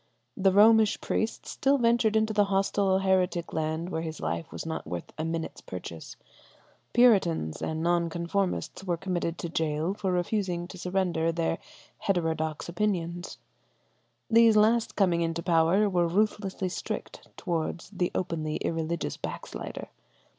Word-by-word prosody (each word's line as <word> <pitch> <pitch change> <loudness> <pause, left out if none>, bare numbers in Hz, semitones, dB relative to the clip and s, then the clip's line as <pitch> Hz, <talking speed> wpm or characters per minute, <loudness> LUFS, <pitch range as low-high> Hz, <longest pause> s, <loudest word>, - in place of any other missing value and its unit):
The 195 -1 +3
Romish 215 +2 +6
priest 220 +1 -2
still 275 +1 +1
ventured 235 -3 +3
into 220 0 +2
the 205 -1 +4
hostile 195 0 +2
heretic 185 -3 +1
land 160 +2 -2
where 160 - -2
his 160 -2 -5
life 85 +1 -3
was - - -6
not 160 0 -4
worth 85 -1 -6
a 155 - -3
minute's 165 0 -4
purchase; 85 -3 -8 0.8
Puritans 190 - +3
and 160 0 -2
Non 170 0 +2
conformists 180 +3 -2
were 175 -3 -1
committed 175 -2 -2
to 170 - -4
gaol 160 +1 -1
for 195 -2 -2
refusing 180 -1 -1
to 185 - -10
surrender 180 -3 0
their 165 0 -1 0.4
heterodox 160 -4 -1
opinions: 175 -2 -2 0.9
these 230 -1 +6
last 225 +2 +3
coming 180 -4 +2
into 165 0 -1
power 175 +4 +3
were 175 -3 +2
ruthlessly 195 0 0
strict - - -6
towards 170 +1 -3
the 180 -3 0
openly 160 -4 -2
irreligious 165 0 -2
backslider. - - -6
175 Hz, 140 wpm, -28 LUFS, 165-200 Hz, 0.9 s, Romish